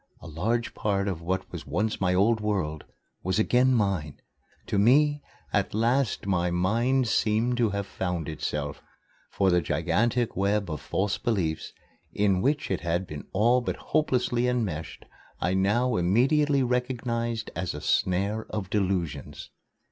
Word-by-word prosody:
A - - -14
large 110 +10 -1
part 100 -1 -1
of 90 -4 -3
what 95 +3 -3
was - - -7
once 110 0 -1
my 90 -1 +2
old 110 +4 +3
world 95 -8 -2 0.4
was 95 +2 -1
again 125 +4 +3
mine. 95 -9 -1 0.5
To 100 - 0
me, 145 +7 +4 0.3
at - - 0
last 120 +2 +1
my 90 -3 +1
mind 115 +9 +1
seemed 115 +3 +1
to 115 -3 +2
have 100 0 -2
found 90 -4 -3
itself, 75 -2 -4 0.5
for 95 -2 +2
the 90 0 +3
gigantic 120 +7 0
web 100 -1 0
of 75 - -4
false 100 +1 -1
beliefs 90 -9 -1 0.4
in 100 -3 +2
which 145 -3 0
it 95 - -1
had 85 +2 -1
been 75 -4 -8
all 120 +6 +3
but 120 - -2
hopelessly 125 -5 0
enmeshed 105 -11 -3 0.3
I 90 - 0
now 110 +6 +2
immediately 135 - +3
recognized 120 -2 -2
as 85 -1 -3
a - - -5
snare 100 +8 0
of 100 -4 -4
delusions. 95 -7 -2
105 Hz, 150 wpm, -27 LUFS, 90-120 Hz, 0.5 s, me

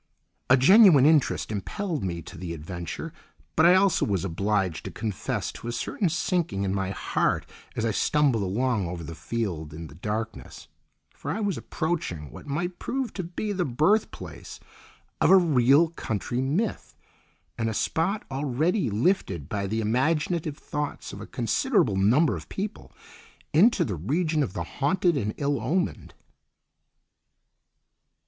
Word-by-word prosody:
A 130 - +7
genuine 170 - +7
interest 150 -7 +3
impelled 160 - -3
me 85 -3 -3
to - - -11
the 85 -2 -5
adventure, 85 +2 -6 0.4
but 160 - +6
I 180 - +7
also 190 -2 +3
was 95 -3 0
obliged 95 -1 -1
to - - -3
confess 105 -5 -3
to - - -9
a - - -1
certain 170 - -1
sinking 170 - -1
in 95 -1 -1
my 95 -1 -1
heart 100 - 0 0.3
as 115 - -1
I 115 - +1
stumbled 140 -1 +2
along 105 +1 0
over 85 -1 -5
the 85 - -7
field 80 -4 -4
in 85 +1 -7
the - - -13
darkness, 110 +6 -5 0.5
for - - -7
I 175 +9 -1
was 205 -3 0
approaching 120 - -3
what 150 - -11
might 175 +5 -3
prove 265 -2 -3
to 190 - -3
be 180 +5 -4
the 185 -3 0
birth 160 - +2
place - - -10 0.6
of - - +5
a 195 - +9
real 150 -2 +4
country 120 -5 -3
myth, 165 +12 -2 0.6
and 115 -1 -1
a - - -2
spot 190 - 0
already 145 - 0
lifted 105 - 0
by 100 +1 -2
the 110 +3 -1
imaginative 150 +7 0
thoughts 150 -1 -5
of - - -8
a - - -8
considerable 95 - +1
number 120 +12 +3
of - - -9
people 205 +2 -5 0.6
into 205 +11 +5
the 100 - -3
region 155 - 0
of 120 -10 -2
the 85 - -3
haunted 170 - +1
and 105 -6 -2
ill 140 -3 0
omened. 170 +10 -2
130 Hz, 155 wpm, -26 LUFS, -, 0.6 s, a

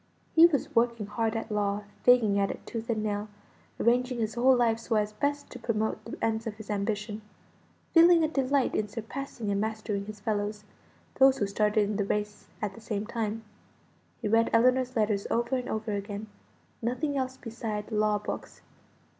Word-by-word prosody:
He 325 +1 +9
was 290 -6 -2
working 235 -2 +2
hard 225 +2 -1
at 225 0 -4
law: 205 0 0 0.2
fagging 225 -5 +5
at 195 - +2
it - - -7
tooth 230 0 -6
and 220 -2 0
nail; 205 0 -2 0.5
arranging 250 +2 +2
his 220 -2 -1
whole 255 +2 +5
life 230 -2 +2
so 230 0 -2
as 210 0 +1
best 285 +6 -2
to 250 - -8
promote 220 -2 -1
the 230 - -7
ends 225 0 -1
of 215 - -4
his 215 0 -8
ambition; 210 +1 -2 0.7
feeling 335 0 +7
a - - +3
delight 275 -3 +1
in 215 - 0
surpassing 225 0 -5
and 200 0 0
mastering 215 -2 -3
his 215 -1 -8
fellows 210 0 -2 0.6
those 270 0 +7
who 205 - +1
started 210 +1 +2
in 205 -1 -2
the 205 - +1
race 210 +1 -3 0.2
at 205 -2 -1
the 225 - -13
same 215 -2 -3
time. 225 -1 -3 0.8
He - - +1
read 225 +2 +3
Ellinor's 255 +2 +3
letters 210 -3 +1
over 235 +2 +1
and 250 -1 -3
over 220 0 -2
again; 205 +1 -4 0.6
nothing 255 +5 -1
else 260 -1 -2
beside 225 -2 -5
law 210 -1 +2
books. 205 - -7
220 Hz, 180 wpm, -28 LUFS, 210-245 Hz, 0.8 s, He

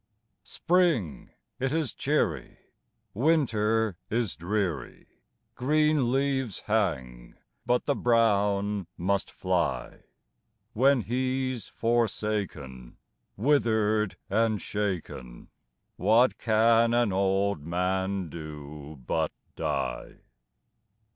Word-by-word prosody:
Spring 165 - +1 0.3
it 130 0 0
is 155 -5 -1
cheery, - - -1 0.6
Winter 110 - +1
is 115 -3 -1
dreary, 90 -6 -3 0.5
Green 150 -1 +2
leaves 135 -5 0
hang, 65 - -2 0.3
but 125 0 +2
the 145 - +2
brown 105 -5 +2
must 95 +3 0
fly; 90 -2 -2 0.7
When 135 +2 +4
he's 130 +1 -2
forsaken, 105 - -2 0.4
Wither'd 110 -5 +2
and 110 -2 +1
shaken, 90 -14 -4 0.5
What 115 +6 +3
can 115 +1 +3
an 120 -5 +2
old 95 -2 +1
man 95 +2 -1
do 75 -2 -9
but 80 -1 0 0.2
die? - - -3
105 Hz, 80 wpm, -27 LUFS, 90-120 Hz, 0.7 s, When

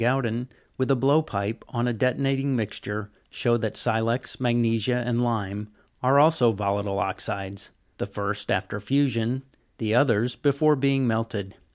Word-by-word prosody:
Gaudin, 120 -1 0 0.3
with 130 - +1
a 135 - +5
blow 140 +5 +4
pipe 110 -6 -4
on 120 0 -1
a 120 - +1
de'tonating 135 +3 +1
mixture, 105 -2 -4 0.2
show 120 -1 +1
that 110 -2 -3
silex, 115 +3 0
magnesia, 120 -1 +2
and 120 0 +1
lime, 105 -3 -2 0.3
are 135 +2 +4
also 150 -6 +5
volatile 100 -1 -1
oxides; 100 +1 -3 0.3
the - - -2
first 100 0 -3
after 95 +2 -1
fusion, 130 +1 0 0.3
the 110 -1 -1
others 120 -1 +3
before 150 +1 +3
being 135 -1 +2
melted. 110 -4 -2
115 Hz, 145 wpm, -25 LUFS, 105-130 Hz, 0.3 s, a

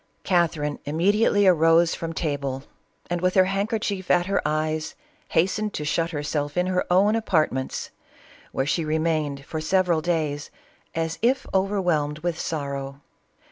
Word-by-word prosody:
Catherine 160 -5 +1
immediately 200 +7 +2
arose 165 -1 +5
from 165 0 -4
table, 140 -5 -3 0.5
and, 175 -1 -1
with 185 0 +1
her 185 -1 +6
handkerchief 200 -1 -2
at 175 -1 +4
her 195 +1 0
eyes, 155 +1 -1 0.3
hastened 200 +5 0
to 150 - -3
shut 165 +3 0
hersjelf 145 -1 -3
in 180 - +2
her 185 0 0
own 200 +4 +4
apartments, 155 - 0 0.6
where 135 - -1
she 165 +3 0
remained 155 -3 -1
for 155 +1 -4
several 180 -1 +2
days, 155 -3 -1 0.5
as 165 0 -2
if 250 +4 +2
overwhelmed 180 -7 +1
with 175 -2 -1
sorrow. 140 -2 -4
165 Hz, 140 wpm, -24 LUFS, 150-185 Hz, 0.6 s, her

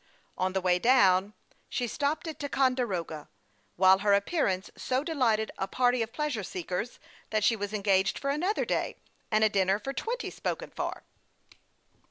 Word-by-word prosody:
On 185 0 -1
the 190 - 0
way 180 -1 +2
down, 200 -4 +4 0.4
she 245 - -1
stopped 290 +7 -2
at 315 -2 -6
Ticonde 270 -3 +1
roga, 165 -6 -4 0.5
while 190 +1 +6
her 205 0 +4
appearance 200 - 0
so 260 +2 -1
delighted 245 -9 +1
a 195 - -1
party 245 +3 +2
of 225 0 -2
pleasure 295 -6 -2
seekers 185 +5 -4 0.3
that 215 -1 0
she 225 +2 +4
was 205 -1 -4
engaged 195 -2 +2
for 275 - -1
another 360 +9 0
day, - - -1 0.3
and 215 0 +3
a - - +7
dinner 195 -2 +2
for 270 +6 -5
twenty 475 - -3
spoken - - -4
for. - - -4
215 Hz, 165 wpm, -29 LUFS, 190-270 Hz, 0.5 s, a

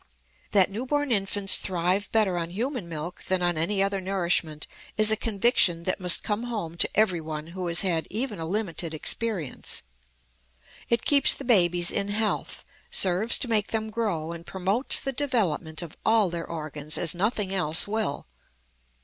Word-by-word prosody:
That 195 -1 +4
newborn 265 +6 -2
infants 195 -2 +3
thrive 185 +3 -1
better 210 -5 +2
on 165 0 -4
human 230 - -4
milk 165 +2 -7
than 185 -1 +1
on 175 -1 +1
any 195 +5 +1
other 195 -1 -1
nourishment 175 -5 -1 0.3
is 215 0 +5
a - - +5
conviction 200 -6 +2
that 185 +3 -2
must 180 -2 +4
come 215 +3 -2
home 210 -9 -5
to - - +2
every 190 -6 +2
one 155 -1 -6
who 185 -1 -4
has 170 0 +2
had 170 -4 0
even 220 -1 -3
a 160 - -4
limited 175 -4 -2
experience. 185 - -2 1.1
It 235 -1 0
keeps 285 -1 +5
the 275 - -8
babies 175 -7 +4
in 200 0 0
health, 210 +1 -2 0.2
serves 190 +5 +2
to 260 - -3
make 220 -3 +1
them 220 -1 -3
grow, 200 -8 -2
and 170 0 -8
promotes 190 +8 0
the 270 - -3
development 205 - -1
of 165 - -10
all 220 -5 +2
their 170 -1 -5
organs 155 -2 -3
as 165 - +4
nothing 200 +1 -1
else 165 -3 +2
will. 215 -8 -2
190 Hz, 165 wpm, -26 LUFS, 170-220 Hz, 1.1 s, is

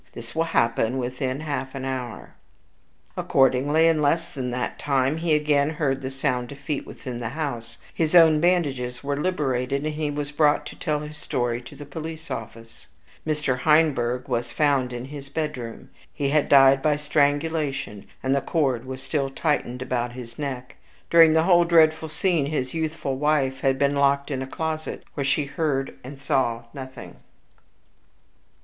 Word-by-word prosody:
This 115 -1 -9
will 165 +1 +1
happen 115 -5 +1
within 130 +2 -3
half 140 -3 -4
an 135 -1 -4
hour." 130 -3 -5 0.8
Accordingly, 140 +4 +3
in 160 -2 +3
less 165 +4 +1
than 130 -3 -4
that 125 0 -3
time, 135 +1 +1
he 165 -1 +2
again 150 -1 +2
heard 145 -4 -1
the 130 - -4
sound 125 -2 -2
of 140 - -9
feet 140 0 -4
within 125 -2 -7
the 115 -2 -3
house, 135 -5 -5 0.2
his 160 +1 0
own 160 -3 +7
bandages 140 -9 0
were 140 0 -1
liberated, 140 -4 -1
and 155 - -1
he 150 -1 -2
was 145 0 -4
brought 150 0 +3
to - - -8
tell 150 -3 -2
his 150 0 -9
story 120 -3 -1
at - - -13
the 145 - -8
police 160 +1 -7
office. 115 -1 -8 0.4
Mr. 150 -4 0
Heinberg 135 -5 +2
was 120 -2 -1
found 140 -4 +1
in 120 0 -5
his 140 0 -9
bedroom. 140 -7 -5 0.2
He 140 -1 -2
had 150 0 +2
died 135 -1 +7
by 150 0 +2
strangulation, 145 -6 0 0.2
and 135 0 +2
the 140 - +1
cord 135 -8 0
was 130 0 -7
still 140 -3 -1
tightened 135 -4 -1
about 120 -1 -2
his 125 +1 -10
neck. 135 -2 -5 0.3
During 165 -2 +7
the 160 0 +4
whole 175 -1 +5
dreadful 160 -2 +4
scene 155 -2 0
his 130 -4 -2
youthful 160 -4 -2
wife 140 -2 +1
had 135 -1 +1
been 140 +1 +2
locked 140 +1 +2
into 130 -1 -3
a - - -17
closet, 160 +1 -4
where 140 - -2
she 140 +2 +1
heard 140 -2 -1
or 130 +3 -8
saw 130 -4 0
nothing. 130 -1 -9
140 Hz, 170 wpm, -24 LUFS, 130-155 Hz, 0.8 s, own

